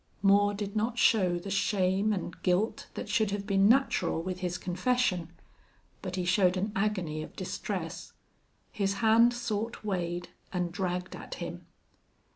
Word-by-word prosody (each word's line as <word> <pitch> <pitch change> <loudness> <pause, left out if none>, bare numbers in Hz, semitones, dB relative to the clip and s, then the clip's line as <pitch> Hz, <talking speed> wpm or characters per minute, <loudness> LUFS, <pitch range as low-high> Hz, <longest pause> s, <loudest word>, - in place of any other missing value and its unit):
Moore 205 +1 +5
did 200 0 -4
not 225 +3 0
show 195 -9 +4
the 195 +3 -6
shame 195 +1 +2
and 180 -3 -4
guilt 185 +5 0
that - - -5
should 220 -3 +2
have 200 0 -3
been 195 0 +4
natural 270 -8 +3
with 180 +2 -4
his 180 -1 -2
confession. 185 -1 0 0.7
But 185 -2 -4
he 180 -1 -1
showed 180 0 +3
an 200 +3 -1
agony 185 -7 -1
of - - -9
distress. - - -4 0.6
His 200 -1 0
hand 230 +2 +6
sought 225 -2 -3
Wade 175 -3 -2 0.2
and 180 -2 -1
dragged 180 -1 -3
at - - -8
him. - - -7
195 Hz, 150 wpm, -30 LUFS, 180-215 Hz, 0.7 s, hand